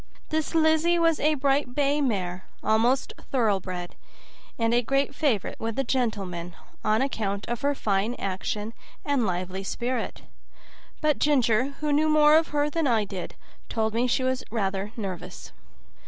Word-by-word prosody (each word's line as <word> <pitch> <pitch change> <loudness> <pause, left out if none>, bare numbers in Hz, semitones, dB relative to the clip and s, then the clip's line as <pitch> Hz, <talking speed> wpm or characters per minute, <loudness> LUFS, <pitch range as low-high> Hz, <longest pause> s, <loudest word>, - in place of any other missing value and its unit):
This 315 0 -1
Lizzie 320 +2 +4
was 330 -2 +3
a 305 +1 +3
bright 275 -2 +1
bay 290 +1 +2
mare, 185 -8 -2 0.2
almost 235 +5 +2 0.2
thoroughbred, 190 -8 0 0.6
and 230 0 +1
a 240 - +4
great 275 +4 0
favorite 275 - 0
with 225 -1 -3
the 270 - 0
gentlemen, 195 -9 -2 0.3
on 215 +3 +2
account 205 -7 -2
of 240 -1 -3
her 285 0 +1
fine 210 +1 0
action 210 +3 -3 0.3
and 275 -6 +1
lively 185 +1 -3
spirit; 240 +4 -3 0.8
but 305 -1 +2
Ginger, 260 -2 +2
who 300 -1 +1
knew 310 +2 +3
more 305 0 +6
of 320 0 +4
her 290 0 +1
than 310 0 0
I 225 -4 +2
did, 190 -3 -6 0.3
told 220 -1 0
me 240 +2 +1
she 255 +1 +1
was 260 0 0
rather 200 -2 -2
nervous. 190 -6 -6
240 Hz, 155 wpm, -26 LUFS, 205-285 Hz, 0.8 s, more